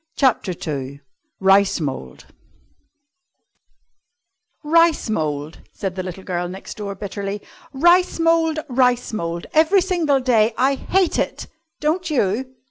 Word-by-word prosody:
CHAPTER 230 -9 +2
II 140 -2 -4 0.4
RICE 195 0 +4
MOULD 130 - -5 2.4
"Rice 330 -5 +3
mould," 150 -4 -3
said 195 -3 -4
the 185 - -4
little 185 +1 -7
girl 175 -1 -3
next 190 +2 -9
door 200 -2 -5
bitterly. 200 +1 -5 0.3
"Rice 345 +6 +3
mould! 330 -1 +2
Rice 250 -2 +1
mould! 170 -4 -3
every 320 +5 +4
single 340 -7 +1
day. 230 -3 +2
I 265 +2 +3
hate 365 +6 0
it, - - -2 0.3
don't 330 +3 -1
you?" 255 -1 -1
225 Hz, 120 wpm, -21 LUFS, 185-310 Hz, 2.4 s, RICE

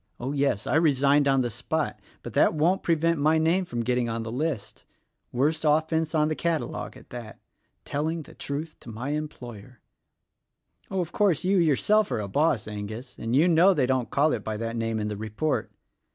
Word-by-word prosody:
Oh, 130 +3 -3
yes! 140 -7 0
I - - +2
resigned 145 -2 +3
on 135 -1 +3
the 120 -1 -2
spot 145 +7 -2
— - - -32
but - - -7
that - - +4
won't 170 +5 +2
prevent 165 -1 +1
my 155 +2 +3
name 165 +4 +2
getting 120 -3 -1
on 115 0 -3
the 115 - -5
list. 135 -2 -3 0.5
Worst 150 +6 0
offence 160 +1 +1
on 150 -1 +3
the 155 - -1
cata 165 -1 0
logue - - -7
at - - -17
that: 120 -3 -8 0.5
Telling 160 +3 -2
the - - -15
truth 150 +3 -5
to - - -12
my 115 +5 -5
employer. 125 -7 -6 1.1
Oh, 190 -1 -1
of 170 - -5
course, 195 -8 +2
you 190 0 +3
yourself 195 +7 +3
are - - -1
a 105 - -3
boss, 140 0 +1
Angus, 110 +4 -7
and 115 +2 -1
you 155 +6 +5
know 180 +3 +5
they 140 -5 +2
don't 130 -2 0
call 150 +2 +2
it 110 - -3
by 110 -1 -3
that 115 +1 -3
name 115 -1 -1
in 105 - -2
the 105 -1 -4
report. 110 +9 -2
140 Hz, 200 wpm, -26 LUFS, 120-160 Hz, 1.1 s, you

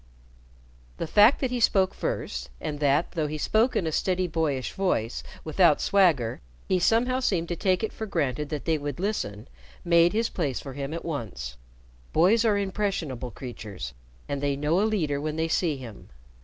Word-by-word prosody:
The - - -2
fact 210 - +5
that 260 -2 0
he 250 - -1
spoke 190 -4 +3
first, - - -3
and 145 -1 -4
that, 145 +2 +2
though 160 -4 -1
he 155 +1 -4
spoke 220 - +2
in 175 - +1
a 160 - -1
steady 185 +3 +1
boyish 155 -6 -1
voice 180 - -1 0.2
without 160 -1 +4
swagger, 160 - +2 0.3
he 185 - +2
somehow 240 +7 +2
seemed 180 -10 0
to 175 - -1
take 185 +3 +1
it 220 - -2
for 220 - -5
granted 150 - -1
that 150 -2 -4
they 160 -2 +1
would 145 0 -5
listen, 125 - -3 0.4
made 170 0 +5
his 225 +2 +1
place 145 -8 -2
for 135 - -8
him 140 +1 -4
at 165 +1 -5
once. 105 - -5 0.6
Boys 195 +8 +4
are 215 -3 +3
impressionable 190 - -2
creatures, 105 - -7 0.3
and 140 -1 -3
they 140 -1 +1
know 150 +5 +1
a - - +3
leader 155 -9 0
when 155 0 -2
they 160 +1 0
see 165 -2 +1
him. 120 -6 -10
160 Hz, 185 wpm, -26 LUFS, 140-195 Hz, 0.6 s, fact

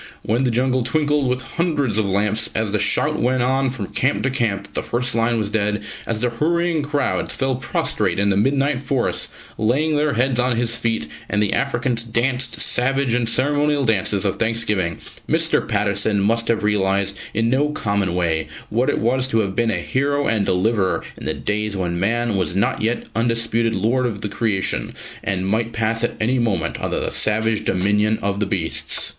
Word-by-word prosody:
When 120 +5 +1
the - - +2
jungle 125 +2 +1
twinkled 145 +1 +1
with 125 +1 -1
hundreds 145 - -1
of 100 -2 0
lamps, 105 +3 +1
as 110 -2 0
the 105 - +1
shout 150 +10 +1
went 125 0 +2
on 135 +1 +1
from 120 -5 -4
camp 135 +3 +1
to 130 - +1
camp 115 -6 0
that - - -15
the - - -1
first 125 +2 -2
lion 115 0 +1
was 105 -2 -1
dead, 105 -1 0 0.2
as 110 -1 -2
the 125 -1 +1
hurrying 170 +5 +1
crowds 145 -1 -1
fell 135 0 0
prostrate 105 -7 -1
in 100 0 +2
the - - +2
midnight 135 +5 +1
forest, 135 -2 -1 0.3
laying 140 +8 +1
their 150 -1 +1
heads 125 +1 +1
on 125 -1 +2
his 115 -1 0
feet, 115 -9 -1 0.2
and 105 - 0
the 105 -2 +2
Africans 125 -3 0
danced 120 +2 0
savage 135 0 +1
and 120 -1 +1
ceremonial 145 +2 +1
dances 100 -2 +1
of 95 - 0
thanksgiving, 110 -7 0 0.3
Mr. - - +1
Patterson 105 -1 +1
must 115 +3 +1
have 115 -2 +1
realised 100 -1 +1 0.2
in 115 +1 +2
no 145 +3 +2
common 100 - -1
way 80 -3 0 0.2
what 120 +4 +1
it - - 0
was 130 +3 +1
to 115 -4 +2
have 95 -2 -3
been 115 +1 +2
a - - 0
hero 140 +2 0
and 110 -5 +1
deliverer 95 +1 +1
in - - -10
the - - 0
days 105 -1 -2
when 85 -2 -2
man 115 +3 +1
was 90 -1 -1
not 100 - +1
yet 115 +2 0
undisputed 115 0 +1
lord 120 +6 +1
of 105 -4 -5
the 105 - -3
creation, 95 - -1 0.3
and 95 -1 -1
might 115 +3 0
pass 115 0 0
at 120 - -1
any 125 +4 +1
moment 105 -9 -1
under - - -1
the - - -1
savage 110 0 +1
dominion 105 +3 +1
of 100 0 -1
the 105 - 0
beasts." 90 -5 -1
115 Hz, 195 wpm, -21 LUFS, 105-130 Hz, 0.3 s, the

